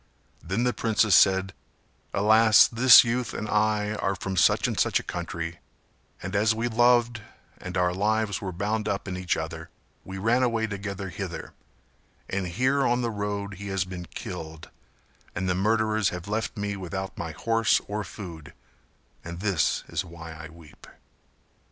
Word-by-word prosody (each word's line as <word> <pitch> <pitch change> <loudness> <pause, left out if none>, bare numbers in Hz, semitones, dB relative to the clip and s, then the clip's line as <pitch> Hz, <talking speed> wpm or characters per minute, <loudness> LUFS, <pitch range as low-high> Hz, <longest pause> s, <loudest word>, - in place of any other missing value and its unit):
Then 95 +8 -1
the 125 0 +1
princess 110 -2 +2
said 95 +1 +4 0.6
"Alas, 110 +1 +6
this 120 +1 +8
youth 120 -1 -2
and 110 - -4
I 105 0 +1
are 100 -2 -1
from 95 +1 -4
such 90 - +3
and - - -3
such - - +2
a - - -8
country 85 -1 -5 0.6
and 95 +2 -4
as 110 +2 +3
we 115 +2 -1
loved 120 0 +3 0.4
and 90 +1 -5
our 90 0 +2
lives 105 +2 0
were 95 - -4
bound 105 +4 -2
up 100 0 -3
in 90 - -4
each 90 -1 -1
other - - -6 0.3
we 95 0 -8
ran 115 +6 +2
away 115 -3 +1
together 100 -2 -5
hither, 85 - -6 0.7
and 95 -1 -2
here 130 +10 +1
on 120 0 +1
the 115 - -1
road 100 -1 -4
he 100 - -6
has 95 -1 -1
been 90 -2 -8
killed 80 0 -8 0.6
and 95 +2 -2
the 90 - +2
murderers 110 +2 +1
have 90 +1 -7
left 110 +2 -3
me 100 0 -2
without 95 0 -5
my 85 - -5
horse 115 +5 +2
or 105 +1 -3
food; 85 -8 -10 0.7
and 85 +1 -7
this 95 -5 0
is - - -2
why 85 -2 -10
I 80 0 -10
weep." 80 -2 -16
100 Hz, 165 wpm, -26 LUFS, 90-110 Hz, 0.7 s, this